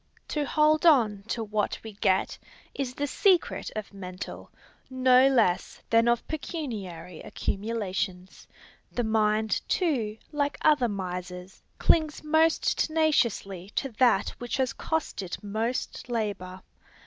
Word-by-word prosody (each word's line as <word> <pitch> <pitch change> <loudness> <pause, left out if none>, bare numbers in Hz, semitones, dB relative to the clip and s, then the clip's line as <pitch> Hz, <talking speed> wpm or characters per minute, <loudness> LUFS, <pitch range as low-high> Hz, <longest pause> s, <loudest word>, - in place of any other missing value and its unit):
To 295 -1 -1
hold 305 +1 +3
on 235 -11 +4
to 230 0 -2
what 210 -1 -1
we 220 -1 -8
get, 190 -1 +1 0.4
is 255 -2 -4
the 285 - -1
secret 360 +5 +2
of 215 -1 -5
mental, 185 -1 -8 0.4
no 255 0 +5
less 225 -10 +2
than 230 +1 +5
of 235 -1 +1
pecuniary 205 - -5
accumulations. 195 -3 -4 0.4
The 245 - -1
mind, 215 -1 +1
too, 245 - 0
like 290 -1 -1
other 295 -5 +4
misers, 180 -1 -6 0.2
clings 310 -2 +2
most 315 +1 +2
tenaciously 235 - +1
to 270 - -1
that 240 -6 +4
which 245 +1 -3
has 260 -2 0
cost 320 -9 -2
it 185 +2 -6
most 225 +5 -3
labor. 200 -5 -3
225 Hz, 125 wpm, -27 LUFS, 195-285 Hz, 0.4 s, no